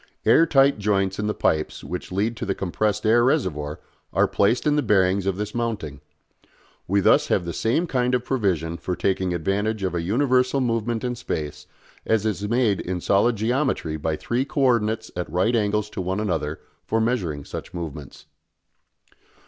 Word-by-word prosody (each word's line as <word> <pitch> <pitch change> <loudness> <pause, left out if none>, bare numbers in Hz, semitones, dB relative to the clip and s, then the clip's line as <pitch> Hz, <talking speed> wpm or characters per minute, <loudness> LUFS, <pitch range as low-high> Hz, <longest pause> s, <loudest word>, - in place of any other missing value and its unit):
Air 165 - +5
tight 135 -5 +4
joints 100 -1 0
in 105 - -1
the 105 - 0
pipes 75 0 0
which 90 +2 -6
lead 105 +5 0
to 115 - -5
the 100 -3 -1
compressed 100 +3 -1
air 115 +2 +5
reservoir 75 - 0 0.3
are - - +3
placed 110 +5 +1
in 150 -1 +3
the 150 - +2
bearings 95 -4 +2
of 95 -1 0
this 105 0 -4
mounting. 110 -12 -3 0.9
We 100 +2 +2
thus - - +4
have 90 - +1
the 85 - -4
same 125 +10 +1
kind 125 -5 +1
of 125 0 -2
provision 90 - 0
for 90 +2 -3
taking 95 -1 0
advantage 100 +5 -1
of 95 -2 -1
a 85 - -1
universal 125 +7 +2
movement 115 -2 -1
in 125 -1 -1
space 75 -10 -5 0.4
as 110 -1 +1
is 105 -1 -2
made 115 -5 +2
in 90 0 -3
solid 100 +6 +2
geometry 115 - 0
by 80 +1 -2
three 120 +10 -1
co 140 +1 -3
ordinates 115 -4 +1
at 90 0 -4
right 95 +7 +2
angles 105 -1 +1
to - - -4
one 95 +2 -2
another 80 -7 -2 0.2
for 115 - 0
measuring 95 - -1
such - - -7
movements. 75 -5 -7
105 Hz, 180 wpm, -23 LUFS, 90-120 Hz, 0.9 s, Air